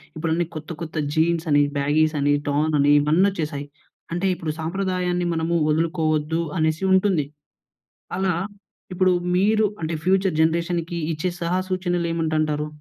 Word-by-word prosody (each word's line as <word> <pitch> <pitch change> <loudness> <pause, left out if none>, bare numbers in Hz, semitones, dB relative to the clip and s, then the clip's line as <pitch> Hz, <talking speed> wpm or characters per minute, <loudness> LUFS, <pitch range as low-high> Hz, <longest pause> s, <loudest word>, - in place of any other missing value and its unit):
ఇప్పుడన్నీ 165 +2 0
కొత్త 155 0 -7
కొత్త 165 -1 -6 0.2
జీన్స్ 165 +1 +1
అని 145 0 +5 0.2
బ్యాగీస్ 155 +2 +2
అని 145 +1 +2
టార్న్ 150 +2 +1
అని 145 +1 +4
ఇవన్నీ 155 +6 +3
వచ్చేశాయి. 150 -5 -4 0.5
అంటే 175 +3 -1
ఇప్పుడు 165 -3 -4
సాంప్రదాయాన్ని 180 +1 -1
మనము 165 +1 -1
వదులుకోవద్దు 160 0 0 0.2
అనేసి 160 +2 0
ఉంటుంది. 190 -5 +2 0.9
అలా 190 -1 +1 0.6
ఇప్పుడు 185 0 +3 0.2
మీరు 215 +3 +3 0.2
అంటే 160 +1 -2
ఫ్యూచర్ 190 -1 +2
జనరేషన్‌కి 170 +1 0
ఇచ్చే 160 +4 -2
సలహా 175 +2 0
సూచనలు 175 -2 -1
ఏమిటంటారు? 155 -2 0
165 Hz, 130 wpm, -23 LUFS, 155-180 Hz, 0.9 s, అని